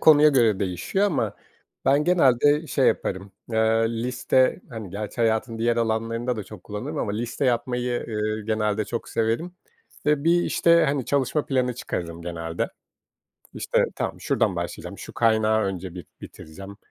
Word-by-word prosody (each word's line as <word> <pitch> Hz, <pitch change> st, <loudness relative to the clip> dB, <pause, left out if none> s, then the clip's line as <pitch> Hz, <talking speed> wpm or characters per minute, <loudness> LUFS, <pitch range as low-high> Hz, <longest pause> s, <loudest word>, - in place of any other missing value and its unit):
konuya 150 Hz, -1 st, +7 dB
göre 115 Hz, -8 st, +3 dB
değişiyor 95 Hz, -, 0 dB
ama 170 Hz, -, -1 dB, 0.5 s
ben 140 Hz, +2 st, +4 dB
genelde 150 Hz, -2 st, +4 dB
şey 135 Hz, -, +2 dB
yaparım, 95 Hz, +1 st, -1 dB, 0.2 s
eee, -, -, 0 dB, 0.5 s
liste, 130 Hz, +4 st, +2 dB
hani, 110 Hz, -6 st, -7 dB
gerçi 105 Hz, +4 st, -6 dB
hayatın 115 Hz, +1 st, +1 dB
diğer 120 Hz, +1 st, +1 dB
alanlarında 115 Hz, +2 st, -1 dB
da 105 Hz, -, -5 dB
çok 100 Hz, -2 st, -12 dB
kullanırım 130 Hz, +9 st, -5 dB
ama 100 Hz, -, -1 dB
liste 120 Hz, +5 st, -3 dB
yapmayı, 125 Hz, 0 st, 0 dB, 0.3 s
eee, 110 Hz, 0 st, -2 dB
genelde 110 Hz, -1 st, 0 dB
çok 115 Hz, +2 st, -5 dB
severim 115 Hz, +11 st, -1 dB, 0.5 s
ve 150 Hz, 0 st, +2 dB
bir, 175 Hz, +1 st, +4 dB
işte, 170 Hz, 0 st, +4 dB
hani, 135 Hz, -3 st, 0 dB
çalışma 140 Hz, +1 st, 0 dB
planı 125 Hz, -3 st, 0 dB
çıkarırım 85 Hz, -8 st, -5 dB
genelde. 85 Hz, -1 st, -3 dB, 0.9 s
İşte, -, -, +1 dB
tamam, -, -, -3 dB
şuradan -, -, +1 dB
başlayacağım, -, -, -5 dB
şu -, -, -9 dB
kaynağı 110 Hz, -1 st, +3 dB
önce 95 Hz, -2 st, -4 dB
bir 90 Hz, -, -8 dB
bitireceğim, 95 Hz, +6 st, -10 dB
115 Hz, 150 wpm, -24 LUFS, 105-135 Hz, 0.9 s, konuya